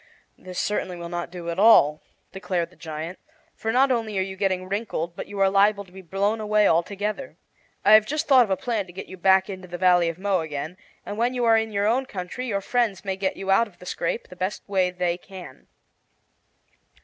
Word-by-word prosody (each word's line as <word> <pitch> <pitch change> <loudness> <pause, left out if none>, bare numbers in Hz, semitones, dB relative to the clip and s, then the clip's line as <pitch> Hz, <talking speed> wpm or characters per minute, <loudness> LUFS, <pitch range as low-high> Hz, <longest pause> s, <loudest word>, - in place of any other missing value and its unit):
"This 185 -1 -10
certainly 185 -3 -2
will 170 0 -7
not 175 0 -4
do 170 -1 -6
at 170 - -4
all," 155 -9 +6 0.3
declared 180 -3 -3
the - - -20
giant; 160 +2 -7 0.3
"for 225 - -3
not 260 +3 +4
only 225 -4 -1
are 190 - +2
you 190 0 -6
getting 185 -1 -1
wrinkled, 190 -5 -3
but - - -6
you 205 - -7
are 195 - +5
liable 200 +1 +3
to 180 - -21
be 190 +1 -11
blown 200 +5 -1
away; 210 -1 +3
altogether. 205 - -1 0.5
I 205 - +6
have 215 0 +7
just 305 +2 -2
thought 260 -3 +7
of 220 - -5
a 190 - +1
plan 225 -6 -2
to 175 - -13
get 190 - -7
you 185 - -10
back 190 +1 +4
into 185 -2 -8
the 175 0 -6
Valley 175 -2 +4
of 165 - -6
Mo 195 0 +1
again, 155 +1 -5 0.3
and 205 - -6
when 245 +2 +1
you 245 -1 0
are 225 -1 +5
in 225 0 0
your 200 0 0
own 255 +5 +1
country 200 +6 -5
your 200 -4 -1
friends 210 -4 -1
may 190 -1 -1
get 190 0 -2
you 195 0 -2
out 230 +4 +4
of 195 - -21
the 180 - -14
scrape 170 +5 -3
the 180 - -11
best 185 +3 -3
way 190 -2 +2
they 180 -1 -2
can." 180 -8 -12
190 Hz, 230 wpm, -24 LUFS, 180-215 Hz, 0.5 s, have